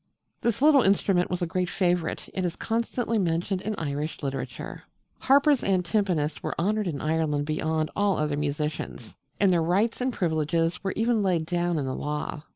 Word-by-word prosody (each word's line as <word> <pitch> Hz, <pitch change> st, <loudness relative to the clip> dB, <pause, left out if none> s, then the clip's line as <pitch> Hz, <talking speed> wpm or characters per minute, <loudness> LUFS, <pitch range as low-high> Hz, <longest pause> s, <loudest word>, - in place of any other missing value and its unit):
This 235 Hz, +2 st, 0 dB
little 295 Hz, -3 st, +7 dB
instrument 195 Hz, -3 st, +2 dB
was 180 Hz, 0 st, -2 dB
a -, -, +2 dB
great 180 Hz, +1 st, -1 dB
favourite, 175 Hz, -3 st, 0 dB
and 185 Hz, -, -2 dB
is 175 Hz, -2 st, -1 dB
constantly 230 Hz, 0 st, -1 dB
mentioned 180 Hz, +1 st, 0 dB
in 215 Hz, +1 st, -3 dB
Irish 150 Hz, 0 st, -3 dB
literature. 135 Hz, -1 st, -5 dB, 0.4 s
Harpers 280 Hz, +1 st, +4 dB
and 185 Hz, -2 st, +1 dB
timpanists 170 Hz, -8 st, 0 dB
were -, -, -4 dB
honoured 210 Hz, +3 st, +1 dB
in 150 Hz, -5 st, -3 dB
Ireland 155 Hz, -2 st, 0 dB
beyond 155 Hz, +1 st, -1 dB
all 205 Hz, -2 st, +2 dB
other 150 Hz, -1 st, 0 dB
musicians; 145 Hz, -4 st, -3 dB, 0.2 s
and 195 Hz, -2 st, +4 dB
their 170 Hz, -, +3 dB
rights 195 Hz, +9 st, +1 dB
and 255 Hz, +1 st, +1 dB
privileges 165 Hz, -2 st, 0 dB
were 195 Hz, -, -1 dB
even 225 Hz, 0 st, +2 dB
laid 180 Hz, -5 st, +1 dB
down 175 Hz, 0 st, 0 dB
in 145 Hz, -, -1 dB
the 130 Hz, -, -2 dB
law. 150 Hz, +1 st, -3 dB
175 Hz, 175 wpm, -26 LUFS, 155-205 Hz, 0.4 s, little